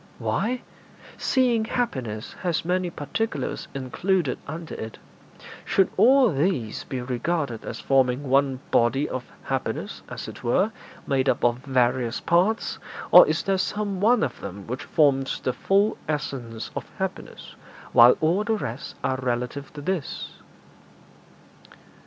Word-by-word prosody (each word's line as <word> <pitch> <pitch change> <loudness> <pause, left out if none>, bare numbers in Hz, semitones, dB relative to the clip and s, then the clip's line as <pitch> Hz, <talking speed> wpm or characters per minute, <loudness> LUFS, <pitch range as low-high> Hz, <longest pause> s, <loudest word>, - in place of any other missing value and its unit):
'Why, 250 +2 -1 0.5
seeing 245 -4 +2
happiness 130 - -3
has 175 -3 -1
many 180 0 0
particulars 220 +9 -3
included 145 +4 0
under 160 +2 -6
it, 110 0 -6 0.7
should 195 - +2
all 260 -2 +6
these 135 - -1
be 130 -3 -4
regarded 125 0 -2
as - - -6
forming 135 0 +2
one 135 0 +2
body 135 +5 +3
of 130 -1 -4 0.2
happiness, - - -3
as - - -6
it - - -10
were, 190 - +2 0.3
made 135 -1 +1
up - - 0
of 120 0 +3
various 125 -2 +1
parts, 180 +7 +1 0.3
or - - +10
is - - 0
there 195 -1 +1
some 200 0 -2
one 230 +2 +4
of 120 - -3
them 100 0 -7
which 125 +3 -5
forms 135 -3 +2
the 130 - -1
full 200 - +2
essence 130 -7 -4
of - - -5
happiness, - - -5 0.4
while 120 +1 +8
all 170 +6 +2
the 220 +1 +1
rest 120 - -5
are 130 - 0
relative 125 +3 -3
to 150 - -7
this?' 175 -1 -3
140 Hz, 135 wpm, -25 LUFS, 125-190 Hz, 0.7 s, or